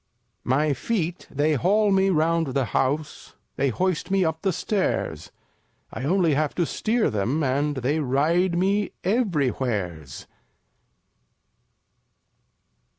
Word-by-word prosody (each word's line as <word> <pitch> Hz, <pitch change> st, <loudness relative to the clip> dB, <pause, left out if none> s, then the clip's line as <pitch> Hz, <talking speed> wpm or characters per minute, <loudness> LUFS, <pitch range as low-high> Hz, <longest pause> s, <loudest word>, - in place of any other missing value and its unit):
2 -, -, -7 dB
My 145 Hz, +3 st, +2 dB
Feet 175 Hz, 0 st, -3 dB
they 150 Hz, +3 st, +1 dB
haul 200 Hz, -, +2 dB
me 195 Hz, 0 st, +3 dB
'round 165 Hz, -4 st, +1 dB
the 135 Hz, -2 st, +2 dB
House; 145 Hz, +7 st, -2 dB, 0.2 s
They 140 Hz, -, +1 dB
hoist 185 Hz, -, -1 dB
me 190 Hz, -1 st, +2 dB
up 160 Hz, 0 st, -2 dB
the 195 Hz, -, +1 dB
Stairs; 120 Hz, -, -2 dB, 0.6 s
I 130 Hz, -, -4 dB
only 170 Hz, 0 st, +2 dB
have 150 Hz, +1 st, 0 dB
to 175 Hz, -, +1 dB
steer 220 Hz, +7 st, 0 dB
them 115 Hz, +9 st, -1 dB
and 145 Hz, +2 st, 0 dB
They 135 Hz, +5 st, 0 dB
ride 160 Hz, +6 st, +1 dB
me 200 Hz, +3 st, +1 dB
everywheres. 125 Hz, -, -1 dB
155 Hz, 120 wpm, -24 LUFS, 135-185 Hz, 0.6 s, me